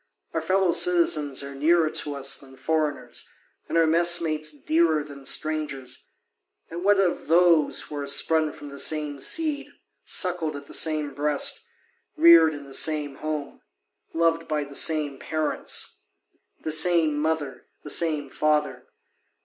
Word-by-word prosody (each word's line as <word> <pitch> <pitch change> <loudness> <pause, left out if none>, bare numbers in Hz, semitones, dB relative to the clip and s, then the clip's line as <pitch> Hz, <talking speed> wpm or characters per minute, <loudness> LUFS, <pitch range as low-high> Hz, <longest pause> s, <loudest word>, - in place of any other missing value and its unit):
Our - - -1
fellow 190 -1 +1
citizens 165 -5 +2
are 140 0 -8
nearer 155 +3 +2
to 145 -1 -3
us 135 0 +1
than 135 -1 -14
foreigners, 150 -6 -3 0.4
and - - -1
our 165 - +4
mess 170 +2 +4
mates 155 -2 -1
dearer 155 +1 0
than 140 -2 -13
strangers, 150 -5 -2 0.7
and 170 +2 -6
what 200 0 +3
of 185 -3 -1
those 170 -2 +3
who 150 - -8
are 140 -1 -4
sprung 155 +2 +2
from 145 - -11
the 140 0 -9
same 150 -2 0
seed, 290 - -1 0.3
suckled 170 -4 -1
at 140 0 -9
the - - -14
same 155 -3 +1
breast, 145 +1 0 0.5
reared 165 -2 +6
in 145 - -9
the 135 -1 -12
same 150 -2 +1
home, 155 -2 -6 0.5
loved 165 0 0
by 150 -1 -2
the 140 0 -12
same 145 -2 0
parents, 155 -1 -3 0.6
the 155 - -3
same 160 -1 +3
mother, 150 -2 -3 0.2
the 150 - -2
same 155 -4 +1
father? 150 +2 -1
155 Hz, 150 wpm, -24 LUFS, 145-165 Hz, 0.7 s, reared